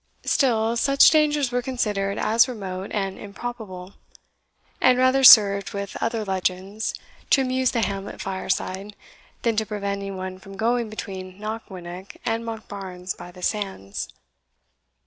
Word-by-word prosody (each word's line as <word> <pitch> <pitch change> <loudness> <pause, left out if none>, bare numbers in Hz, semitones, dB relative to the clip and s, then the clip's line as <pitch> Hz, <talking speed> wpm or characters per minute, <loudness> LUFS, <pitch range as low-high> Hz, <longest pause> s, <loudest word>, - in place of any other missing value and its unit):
Still, 230 -5 +2
such 275 +3 +6
dangers 295 -4 +3
were 245 0 0
considered 210 -6 -1
as 225 +4 +4
remote 195 -6 -5
and 195 -2 -2
improbable; 200 -3 -7 0.9
and 255 -1 +5
rather 255 +1 +3
served, 200 -5 +8
with 200 0 -5
other 225 -1 -1
legends, 190 +2 -2 0.3
to 275 - +5
amuse 260 -1 +1
the 235 - 0
hamlet 195 0 -4
fireside, 190 +1 -3 0.5
than 230 -2 +2
to 220 - +3
prevent 200 -2 -3
any 200 0 -5
one 185 -1 -6
from 195 0 -12
going 235 +1 +1
between 190 -3 -7
Knockwinnock 190 -4 -7
and 230 -1 0
Monkbarns 195 -5 -6
by 175 - -10
the 180 0 -13
sands. 190 - -3
205 Hz, 135 wpm, -24 LUFS, 190-235 Hz, 0.9 s, served